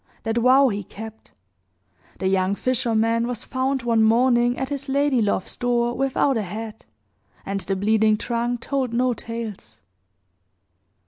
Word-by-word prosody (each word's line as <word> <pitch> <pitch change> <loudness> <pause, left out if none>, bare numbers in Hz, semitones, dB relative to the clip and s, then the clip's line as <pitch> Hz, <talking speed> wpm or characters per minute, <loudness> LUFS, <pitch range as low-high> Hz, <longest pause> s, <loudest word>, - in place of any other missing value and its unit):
That 225 +1 0
vow 260 +3 +5
he 205 -2 -3
kept. 220 +3 -10 0.9
The 190 - -1
young 190 +1 +1
fisherman 230 -1 +1
was 245 -1 -3
found 265 0 -1
one 230 -2 +2
morning 240 +2 +3
at 265 0 -3
his 280 -1 -5
lady 280 -2 +2
love's 200 -3 -1
door 240 -1 0
without 270 0 +1
a - - 0
head, 215 +3 -7 0.6
and 195 0 -2
the 195 0 -2
bleeding 215 +2 +2
trunk 240 +1 -2
told 265 -3 -2
no 250 +1 +2
tales. 220 - -7
235 Hz, 140 wpm, -23 LUFS, 220-255 Hz, 0.9 s, vow